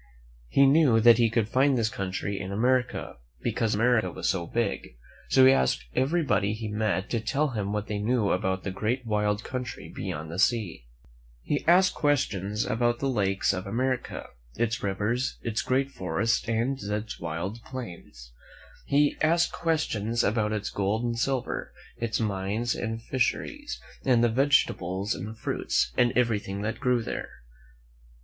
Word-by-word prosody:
He 140 - +4
knew 135 -5 +5
that 115 0 +7
he 115 -1 +4
could 115 -1 +1
find 130 +3 +3
this 115 -2 +1
country 95 0 -3
in 95 0 -5
America, 125 - 0 0.3
because 115 -3 0
America 115 +1 +3
was - - -3
so 85 -3 0
big; 115 - -2 0.3
so 130 - +6
he 130 - +8
asked 65 - +1
everybody 135 - +1
he 110 0 -5
met 105 -2 -1
to 115 - +1
tell 145 +7 0
him 105 -5 -3
what 105 0 -2
they 105 -1 -3
knew 110 -1 +1
about 95 +1 0
the 100 - -3
great 120 +6 -2
wild 105 -1 0
country 125 -3 -6
beyond 80 +1 -5
the 85 - -5
sea. 105 - 0 0.6
He 145 - -1
asked 185 +2 +5
questions 105 -8 0
about 120 +1 +1
the 135 - -2
lakes 100 -6 +1
of 95 0 -4
America, 130 +4 -2 0.3
its 120 +1 -1
rivers, 105 +6 -1
its 115 -2 -1
great 135 +2 0
forests 95 +4 -1
and 120 +4 0
its 105 +2 -4
wide 85 +7 -4
plains. 85 - -9 0.6
He 145 +1 +3
asked 170 +2 +3
questions 120 -9 0
about 105 0 +1
its 105 -1 -2
gold 100 +3 0
and 120 -1 -1
silver, 130 0 -2 0.2
its 115 -2 -2
mines 105 +2 -1
and 115 0 -4
fisheries, 290 - -2 0.2
and 125 -3 +3
the 120 - +4
vegetables 110 -7 +1
and 110 +2 -7
fruits, - - -1
and 120 -1 +3
everything 105 -4 0
that 110 +2 -3
grew 125 -4 +1
there. - - -4
115 Hz, 155 wpm, -27 LUFS, 100-125 Hz, 0.6 s, he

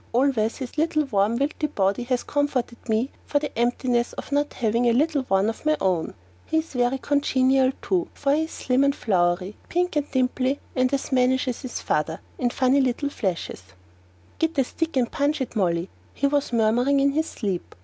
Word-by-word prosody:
Always 240 -3 +2
his 260 +2 -5
little, 310 -1 +2
warm, 210 -2 +1
wilty 295 +3 -1
body 195 +3 +1
has 250 0 0
comforted 265 -5 -2
me 225 +5 +1 0.2
for 290 - +1
the 295 +1 -3
emptiness 240 +1 0
of - - -8
not 290 +1 0
having 235 +1 +1
a - - +3
little 295 +3 +2
one 195 -2 +2
of 225 - -4
my 310 0 +2
own. 180 -4 +1
And - - -10 0.3
he's 320 -1 -1
very 250 +1 +1
congenial, 265 -2 +2
too, 360 -2 0
for 280 0 +1
he's 320 +2 0
slim 260 -2 +1
and 280 0 +2
flowery, 180 -1 0
pink 360 -1 0
and 295 -1 0
dimply, 260 +1 0 0.2
and 255 0 +2
as 275 +1 -2
mannish 260 0 +2
as 250 - -3
his 255 -3 -5
father, 160 +2 -1 0.2
in 245 - +1
funny 260 +3 +3
little 260 +2 0
flashes. 185 - -3 0.8
"Git 325 -1 0
a 270 - +4
stick 325 +5 -3
to 255 -3 +2
punch 285 +5 -1
it, 260 -3 -4
Molly," 175 -4 +1 0.3
he 280 - 0
was 285 -1 +1
murmuring 240 +5 +3
in 280 +1 +3
his 315 +3 0
sleep. 195 -6 -4
255 Hz, 190 wpm, -24 LUFS, 230-285 Hz, 0.8 s, a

